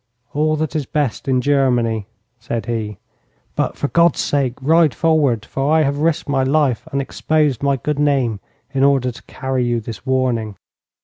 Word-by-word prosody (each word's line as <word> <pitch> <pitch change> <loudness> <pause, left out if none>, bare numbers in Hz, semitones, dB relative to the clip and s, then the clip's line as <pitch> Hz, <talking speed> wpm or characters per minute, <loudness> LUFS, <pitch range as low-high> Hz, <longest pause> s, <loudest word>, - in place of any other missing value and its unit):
'All 155 +1 +1
that 155 0 -3
is 145 -4 -1
best 135 -10 -2
in 130 -1 +2
Germany,' 125 -6 +1 0.3
said 115 -1 -4
he. 110 -4 -3 0.6
'But - - -1
for 145 - -1
God's 170 -2 +3
sake 135 -4 0
ride 155 +1 +3
forwards, 145 -9 +2
for 135 +2 -1
I 160 0 +4
have 140 0 -1
risked 160 0 0
my 140 -2 +1
life 135 -3 +1
and 140 - -1
exposed 145 -1 0
my 140 -1 +1
good 145 +4 -2
name 135 -7 +1 0.3
in 135 0 +1
order 135 -3 +3
to 120 - -14
carry 130 -1 -2
you 120 -1 0
this 115 -1 -8
warning.' 125 -5 0
135 Hz, 175 wpm, -19 LUFS, 120-150 Hz, 0.6 s, I